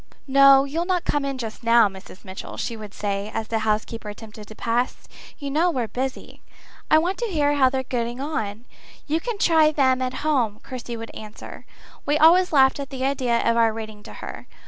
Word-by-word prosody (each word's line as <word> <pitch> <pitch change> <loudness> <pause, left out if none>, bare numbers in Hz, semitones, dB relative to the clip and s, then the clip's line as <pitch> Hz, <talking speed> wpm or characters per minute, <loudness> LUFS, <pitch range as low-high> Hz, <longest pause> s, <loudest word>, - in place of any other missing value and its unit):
"No, 275 0 +7
you'll 315 +5 -2
not 365 -2 0
come 290 -1 0
in 275 -1 -3
just 225 -3 -6
now, 230 -1 +5
Mrs. 190 0 -12
Mitchell," 190 0 -8
she 230 - -3
would 215 -2 -9
say, 200 0 -3
as 220 -1 -3
the 225 - 0
housekeeper 215 0 -2
attempted 210 0 -10
to 215 - -11
pass. 240 +3 -2 0.3
"You 280 -2 -5
know 325 +5 +2
we're 250 -8 -1
busy." 260 +5 -5 0.5
"I 310 - +6
want 355 +5 0
to 475 - -1
hear 295 -7 +1
how 270 -3 +4
they're 260 0 -2
getting 240 -1 -3
on." 230 -6 -4 0.4
"You 315 +2 0
can 470 +3 -4
try 320 -5 +4
them 260 -3 +2
at 255 +3 -3
home," 240 -9 +1
Kirsty 245 -2 -6
would 225 0 -8
answer. 215 0 -10 0.4
We 295 +1 +1
always 350 +4 +5
laughed 265 -2 +4
at 280 -1 -5
the 265 -1 -3
idea 255 -4 0
of 230 - +3
our 230 -1 +4
reading 215 -1 -8
to - - -11
her. - - -9
255 Hz, 205 wpm, -23 LUFS, 220-290 Hz, 0.5 s, No